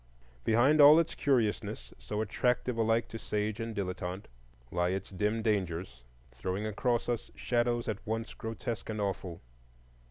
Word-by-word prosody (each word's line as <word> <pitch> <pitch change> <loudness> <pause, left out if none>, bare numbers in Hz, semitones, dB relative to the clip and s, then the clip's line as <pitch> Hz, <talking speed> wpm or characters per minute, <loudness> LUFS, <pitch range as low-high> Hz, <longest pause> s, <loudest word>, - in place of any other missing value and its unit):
Behind 130 +7 +5
all 145 +2 +10
its 165 -1 +2
curiousness, 120 -7 0
so 70 - -3
attractive 125 +3 0
alike 115 0 +2
to 115 - -6
sage 105 +1 -2
and 115 -1 -4
dilettante, 95 0 -3 0.5
lie 90 0 +1
its 95 +2 -3
dim 105 +3 0
dangers, 90 - -1 0.3
throwing 95 - -3
across 120 +3 0
us 120 -2 -2
shadows 120 -1 0
at 105 -3 -3
once 115 +1 -2
grotesque 115 0 -5
and 110 -1 -3
awful. 95 -4 -3
110 Hz, 140 wpm, -31 LUFS, 95-120 Hz, 0.5 s, all